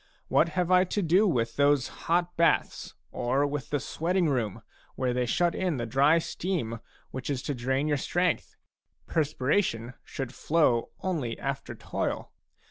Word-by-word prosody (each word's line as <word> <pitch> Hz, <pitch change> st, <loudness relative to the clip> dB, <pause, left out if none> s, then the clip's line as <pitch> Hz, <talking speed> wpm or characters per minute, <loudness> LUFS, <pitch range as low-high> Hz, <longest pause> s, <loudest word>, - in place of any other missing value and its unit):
What 170 Hz, -, +4 dB
have 180 Hz, 0 st, +1 dB
I 185 Hz, 0 st, +6 dB
to 195 Hz, +2 st, -1 dB
do 180 Hz, +6 st, +4 dB
with 115 Hz, -9 st, 0 dB
those 140 Hz, -2 st, +4 dB, 0.2 s
hot 175 Hz, +1 st, +2 dB
baths 170 Hz, 0 st, +1 dB, 0.2 s
or 130 Hz, +4 st, +1 dB
with 145 Hz, -1 st, -3 dB
the 145 Hz, -, 0 dB
sweating 175 Hz, +4 st, 0 dB
room 115 Hz, -8 st, -1 dB, 0.3 s
where 125 Hz, -1 st, 0 dB
they 125 Hz, 0 st, 0 dB
shut 175 Hz, +7 st, +2 dB
in 180 Hz, -6 st, -1 dB
the 120 Hz, -, -2 dB
dry 140 Hz, +7 st, +4 dB
steam 160 Hz, -9 st, -2 dB, 0.3 s
which 130 Hz, +2 st, -5 dB
is 140 Hz, -2 st, -2 dB
to 145 Hz, -, -2 dB
drain 130 Hz, +3 st, 0 dB
your 145 Hz, -1 st, +2 dB
strength? 175 Hz, +5 st, 0 dB, 0.5 s
Perspiration 140 Hz, -, 0 dB
should 135 Hz, -3 st, -5 dB
flow 150 Hz, -8 st, +2 dB
only 150 Hz, -12 st, -2 dB
after 140 Hz, -1 st, -4 dB
toil. -, -, -3 dB
145 Hz, 155 wpm, -28 LUFS, 125-170 Hz, 0.5 s, I